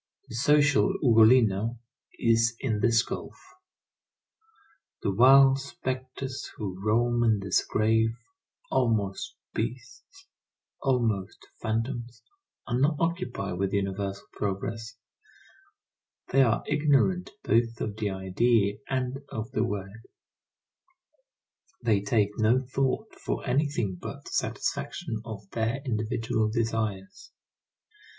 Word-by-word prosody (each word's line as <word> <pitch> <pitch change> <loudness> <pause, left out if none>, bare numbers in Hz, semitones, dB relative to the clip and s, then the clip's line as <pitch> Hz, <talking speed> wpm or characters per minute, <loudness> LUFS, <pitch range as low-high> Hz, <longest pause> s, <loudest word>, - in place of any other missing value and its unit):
The - - -9
social 145 +8 +4
Ugolino 115 -2 +5 0.4
is 115 0 +3
in 110 -6 -1
this 115 +1 +3
gulf. - - -7 1.6
The 100 - +1
wild 135 +5 +7
spectres 130 -1 -5
who 95 -3 -5
roam 120 +3 +2
in 115 -2 +3
this 95 -2 +1
grave, 110 +1 +1 0.5
almost 110 -6 0 0.2
beasts, 130 - -6 0.6
almost 115 -8 0 0.2
phantoms, 120 +2 -3 0.4
are 120 0 -1
not 150 +3 +3
occupied 165 - -2
with 95 0 -1
universal 100 +1 -2
progress; 110 +3 -4 1.4
they 135 - +5
are 115 -3 +2
ignorant 155 +5 +2
both 115 +1 +1
of 105 -1 -4
the 105 -2 -1
idea 100 +2 +1
and 130 0 -1
of 110 +3 -5
the 110 - +1
word; 105 0 -5 1.8
they 105 -4 +3
take 105 -2 +2
no 110 +3 +4 0.2
thought 135 +11 0
for - - -2
anything 125 -8 0
but - - -7
the - - -10
satisfaction 110 -2 -2
of 105 -3 -8
their 115 +3 -1
individual 110 -1 -1
desires. 110 -4 -3
115 Hz, 105 wpm, -27 LUFS, 105-130 Hz, 1.8 s, wild